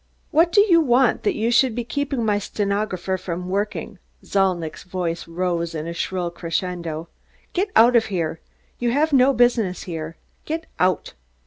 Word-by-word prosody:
"What 335 +2 +4
do 405 - +6
you 350 -5 +5
want 255 -3 +3
that - - 0
you 225 +2 0
should 245 -1 +3
be 240 - -2
keeping 275 -1 -2
my 205 -1 +2
stenographer 200 -2 -2
from 180 0 -5
working?" 200 -1 -3 0.3
Zalnitch's 180 -5 0
voice 175 -2 -4
rose 170 -1 -2
in 155 0 -4
a 170 - -4
shrill 175 0 -2
crescendo. 170 -1 -3 0.5
"Get 390 +3 0
out 235 +2 +6
of 230 - +4
here! 165 -5 -2 0.4
You 240 - +1
have 300 +2 +2
no 265 0 +6
business 240 -7 +2
here. 165 -2 -6 0.3
Get 320 +1 -4
out!" 185 0 +1
195 Hz, 160 wpm, -22 LUFS, 175-245 Hz, 0.5 s, do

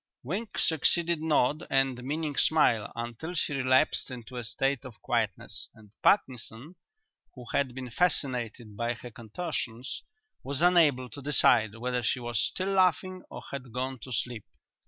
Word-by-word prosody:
Wink 195 - -4
succeeded 170 +1 +2
nod 155 0 +2
and 135 -2 +1
meaning 150 +2 -2
smile 120 -11 +3
until 120 +9 -5
she 150 - 0
relapsed 130 +2 +2
into 125 0 -8
a 120 - -3
state 135 +3 -1
of 130 -5 -11
quietness; - - -1
and 105 -2 -17
Parkinson, 130 - +1 0.6
who 125 -2 -10
had 130 -3 +1
been 130 -2 -6
fascinated 120 - 0
by 120 +2 -1
her 120 +1 -10
contortions, 115 0 -4 0.4
was 140 +1 -3
unable 155 -8 +5
to 125 +4 -8
decide 120 -6 +4
whether 125 +2 -1
she 120 +3 0
was 120 -3 0
still 190 +1 -1
laughing 185 0 +2
or - - -8
had 130 -3 -6
gone 130 +2 -3
to 130 - -9
sleep. 120 -1 -3
130 Hz, 150 wpm, -29 LUFS, 120-155 Hz, 0.6 s, unable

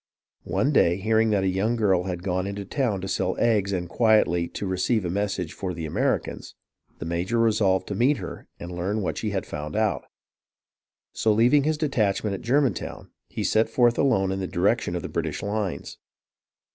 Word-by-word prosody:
One 140 - +1
day, 85 - +3
hearing 110 +2 +2
that 100 -3 +2
a - - +1
young 95 +5 +1
girl 95 -6 +2
had 90 -2 -4
gone 95 0 -1
into 100 0 -5
town 110 -3 -1
to 95 - -4
sell 95 - -1
eggs 105 -4 +2
and 90 -2 -2
quietly 90 -5 +3
to 100 - -6
receive 95 +3 0
a - - -1
viessage 95 -3 -2
for 90 -3 -5
the 80 -1 -5
Ameri 75 - 0
cans, - - -9 0.4
the - - -6
major 85 +7 -1
resolved 105 -5 +2
to - - -2
meet 130 +8 +2
her - - -8
and 85 - -7
learn 100 +4 -2
what - - -2
she 110 - -2
had 95 -2 -2
found 75 +3 -6
out. 110 -1 0 1.1
So, 110 - +1
leaving 125 +7 +4
his 155 0 +1
detachment 110 -9 0
at 95 - -5
German 135 +2 +2
town, - - -8 0.2
he - - -4
set 110 +1 +2
forth 120 -2 +3
alone 95 -9 +2
in 95 - -2
the 95 - -3
direction - - 0
of - - -3
the - - -3
British - - -3
lines. 100 -7 -3
100 Hz, 195 wpm, -25 LUFS, 95-115 Hz, 1.1 s, leaving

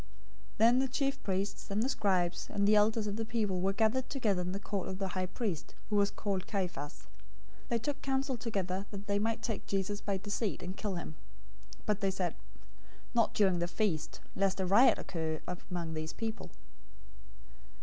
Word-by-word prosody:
026:003 - - -24
Then 235 +3 +6
the 265 - +2
chief 275 +1 0
priests, 195 +1 -2
the 210 +5 +1
scribes, 185 -8 +1
and 200 -1 +2
the 215 - +6
elders 215 +1 +4
of 205 0 -2
the 225 - -1
people 210 -5 0
were 190 +1 +3
gathered 225 +5 +2
together 215 -10 +1
in 180 +1 -2
the 195 - -3
court 200 -2 -3
of 190 - -3
the 195 -1 -2
high 185 0 -1
priest, 190 -5 -3 0.2
who - - +2
was 200 0 +4
called 195 -3 -2
Caiaphas. 180 -8 -3 0.6
026:004 - - -23
They 235 - +2
took 285 +5 -3
counsel 270 0 0
together 195 -4 -2
that 200 -1 -7
they 200 -1 +1
might 225 +2 0
take 225 -4 -2
Jesus 200 +1 -1
by 200 -2 0
deceit, 205 +1 -2
and 185 +1 -4
kill 200 -2 -2
him. 160 -2 -6 0.6
026:005 - - -27
But 210 -1 +1
they 195 - +3
said, 185 -3 -1 0.8
"Not 230 -2 +3
during 190 -4 +4
the 175 - +1
feast, 175 -5 -1
lest 195 -1 +2
a 190 - +2
riot 210 +8 +6
occur 160 -3 -2
among 175 -2 -4
the 155 0 -3
people." 225 -1 -3
200 Hz, 190 wpm, -33 LUFS, 185-220 Hz, 0.8 s, Then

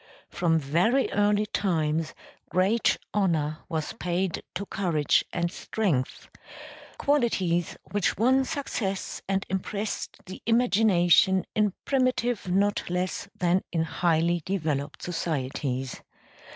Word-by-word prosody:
From 165 -2 +1
very 175 - +2
early 205 +1 +2
times 160 -6 0 0.3
great 195 +6 +2 0.2
honor 160 -6 +1
was 160 -3 -2
paid 180 0 -2
to 195 +3 -3
courage 170 -7 +1
and 170 -1 -1
strength; 175 -15 -2 0.7
qualities 190 - +1
which 205 -3 +1
won 260 +5 +4
success 235 -9 -3
and 195 0 0
impressed 200 +3 -3
the 185 - -9
imagination 195 -6 +4
in 210 -3 +2
primitive 250 -6 +1
not 200 +2 +1
less 180 +2 -2
than 180 +1 +2
in 165 -2 +1
highly 170 +1 +1
developed 155 -6 -2
societies. 135 -6 -3
185 Hz, 105 wpm, -27 LUFS, 165-205 Hz, 0.7 s, won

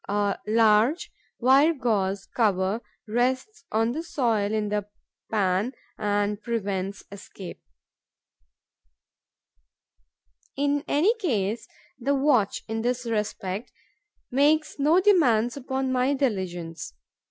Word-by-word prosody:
A 205 0 0
large 225 +7 +3 0.3
wire 275 +6 +5
gauze 200 -7 0
cover 205 -1 0 0.3
rests 260 - -1
on 225 +2 +2
the 305 +6 -3
soil 230 -11 0
in 215 -1 -1
the 210 -1 -2 0.4
pan 205 +3 +1 0.2
and 205 0 -1
prevents 200 -4 -3
escape. 195 -2 -10 3.0
In 285 +1 +1
any 345 +10 +3
case, 225 - -1 0.3
the 275 +3 +1
watch, 265 -8 +2
in 225 0 -2
this 250 +1 -1
respect, 210 -2 -3 0.6
makes 300 +4 +2
no 310 +5 +4
demands 250 - +3
upon 265 -1 -2
my 260 +2 +2
diligence. 175 - -3
230 Hz, 100 wpm, -26 LUFS, 205-270 Hz, 3.0 s, wire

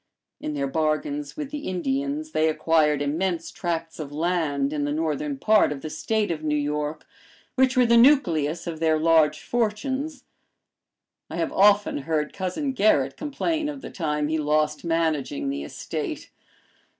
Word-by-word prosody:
In 150 - -4
their 140 -1 -1
bargains 160 - -1
with 295 -2 -5
the 295 -1 -5
Indians 280 - -2
they 160 - +2
acquired 155 -2 +2
immense 165 +3 -1
tracts 165 -2 -4
of 145 -2 -6
land 150 -3 0
in 150 -1 -1
the 145 - -1
Northern 150 -2 -2
part 215 +2 +4
of 140 -2 -5
the 155 - -6
State 210 +5 -1
of 155 -2 -3
New 150 -1 +1
York, 150 +1 -2 0.5
which 260 0 +2
were 250 - +6
the 235 0 +5
nucleus 175 - +4
of 165 -2 -5
their 160 -1 +3
large 155 -1 +3
fortunes. 255 +6 -2 1.1
I - - -6
have - - -2
often 205 -3 +4
heard 150 +1 -2
Cousin 200 +9 -2
Gerrit 145 - +3
complain 305 +1 -2
of 285 -2 -7
the - - -8
time 150 -4 -1
he 160 +1 0
lost 150 0 +1
managing 165 - -1
the 285 - -4
estate. - - -5
165 Hz, 160 wpm, -25 LUFS, 150-240 Hz, 1.1 s, were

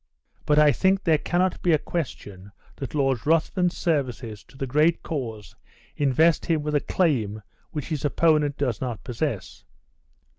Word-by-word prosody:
But 150 - +3
I 150 -1 +6
think 190 +5 +2
there 160 -3 +3
cannot 180 +3 0
be 175 - +3
a - - +5
question 100 - -6 0.3
that 135 +2 -6
Lord 135 -5 +1
Ruthven's 170 +3 +1
services 125 -9 -2
to - - -18
the 135 - -2
great 150 +6 +2
cause 115 -9 -5 0.4
invest 150 +4 +2
him 160 -3 +1
with 150 0 -2
a 145 - +4
claim 115 - 0 0.3
which 150 -1 -5
his 155 -4 -3
opponent 150 -1 +2
does 125 -6 -1
not 120 -5 -4
possess. 115 - -4
145 Hz, 155 wpm, -25 LUFS, 125-160 Hz, 0.4 s, I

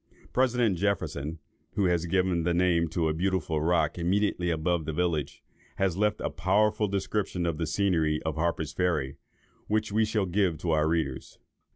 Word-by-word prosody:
President 120 -7 +2
Jefferson, 80 -6 -1 0.4
who 100 -3 +2
has 85 -1 +1
given 90 -1 +1
the 85 +1 0
name 85 -2 +2
to 80 +1 -1
a 80 - +1
beautiful 85 -3 -1
rock 85 +2 +1
immediately 90 0 +1
above 80 0 0
the 80 - -3
village, 80 -4 -1 0.3
has 95 -3 0
left 105 +1 +1
a - - -2
powerful 105 +2 +2
description 95 -2 -2
of 85 -2 -2
the 80 - -1
scenery 80 -3 +1
of 80 - -1
Harper's 80 -1 -1
Ferry, 75 -7 -1 0.5
which 110 0 0
we 110 +2 +3
shall 105 -2 0
give 90 -2 +1
to 85 +2 -2
our 75 0 +2
readers. 80 -5 -2
90 Hz, 170 wpm, -28 LUFS, 80-100 Hz, 0.5 s, we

